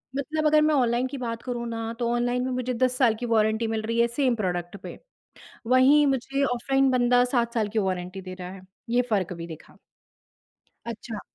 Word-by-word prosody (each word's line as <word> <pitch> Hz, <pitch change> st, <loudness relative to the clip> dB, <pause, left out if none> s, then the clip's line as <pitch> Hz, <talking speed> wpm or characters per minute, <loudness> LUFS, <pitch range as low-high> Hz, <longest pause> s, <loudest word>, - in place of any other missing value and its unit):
मतलब 310 Hz, +3 st, -2 dB
अगर 305 Hz, 0 st, +5 dB
मैं 305 Hz, 0 st, +3 dB
ऑनलाइन 245 Hz, -1 st, +2 dB
की 275 Hz, +1 st, -6 dB
बात 230 Hz, -2 st, -4 dB
करूँ 240 Hz, -2 st, -4 dB
ना 225 Hz, 0 st, -4 dB
तो 240 Hz, -, 0 dB
ऑनलाइन 245 Hz, +1 st, 0 dB
में 260 Hz, -, -2 dB
मुझे 255 Hz, 0 st, -2 dB
10 255 Hz, +1 st, +1 dB
साल 235 Hz, -4 st, +3 dB
की 245 Hz, -, -3 dB
वारंटी 220 Hz, 0 st, +1 dB
मिल 220 Hz, -1 st, -2 dB
रही 230 Hz, +1 st, -2 dB
है 235 Hz, -, +4 dB
सेम 250 Hz, +1 st, +1 dB
प्रोडक्ट 175 Hz, -4 st, -3 dB
पे। -, -, -8 dB, 0.7 s
वहीं 265 Hz, +4 st, +5 dB
मुझे 270 Hz, +1 st, 0 dB
ऑफलाइन 270 Hz, +2 st, +1 dB
बंदा 245 Hz, 0 st, +3 dB
7 240 Hz, -2 st, 0 dB
साल 215 Hz, -3 st, 0 dB
की 220 Hz, -, 0 dB
वारंटी 185 Hz, +1 st, -4 dB
दे 185 Hz, 0 st, -7 dB
रहा 180 Hz, -1 st, -8 dB
है। 195 Hz, -, -10 dB, 0.3 s
ये 245 Hz, +1 st, +3 dB
फ़र्क 195 Hz, -4 st, 0 dB
भी 170 Hz, -1 st, -7 dB
दिखा। 160 Hz, -2 st, -12 dB, 1.1 s
अच्छा। 230 Hz, -1 st, -6 dB
235 Hz, 200 wpm, -25 LUFS, 220-255 Hz, 1.1 s, अगर